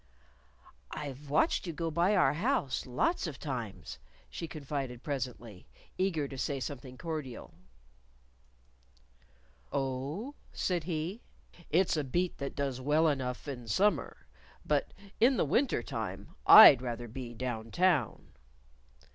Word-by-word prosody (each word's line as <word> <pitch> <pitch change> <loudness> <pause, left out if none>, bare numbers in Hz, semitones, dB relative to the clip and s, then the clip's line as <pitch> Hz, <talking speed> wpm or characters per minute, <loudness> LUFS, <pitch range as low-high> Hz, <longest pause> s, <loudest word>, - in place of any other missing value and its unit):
"I've 145 0 -7
watched 155 +5 +2
you 170 - -3
go 165 +1 -3
by 175 +6 +2
our 185 - +4
house 170 - -1
lots 190 - 0
of 145 -4 -6
times," 105 - -6 0.3
she 165 - -5
confided 140 -5 -5
presently, 120 -8 -5 0.3
eager 175 -6 0
to 135 -1 -8
say 140 +1 -1
something 130 -1 -7
cordial. 155 -7 -6 2.2
"Oh?" 140 - -3 0.2
said 175 -4 -1
he. 175 +6 -3 0.5
"It's 180 +3 +3
a 150 - 0
beat 175 +7 -1
that 140 - -4
does 135 -3 -2
well 150 +4 +3
enough 130 -3 -2
in 125 -4 -6
summer. 160 - 0 0.4
But 145 -2 0 0.3
in 250 +3 +5
the - - +2
wintertime 270 +2 -1 0.2
I'd 145 - +11
rather 120 -1 -4
be 120 +1 -7
Down 115 -2 -4
Town." 170 - +1
140 Hz, 120 wpm, -31 LUFS, 125-170 Hz, 2.2 s, I'd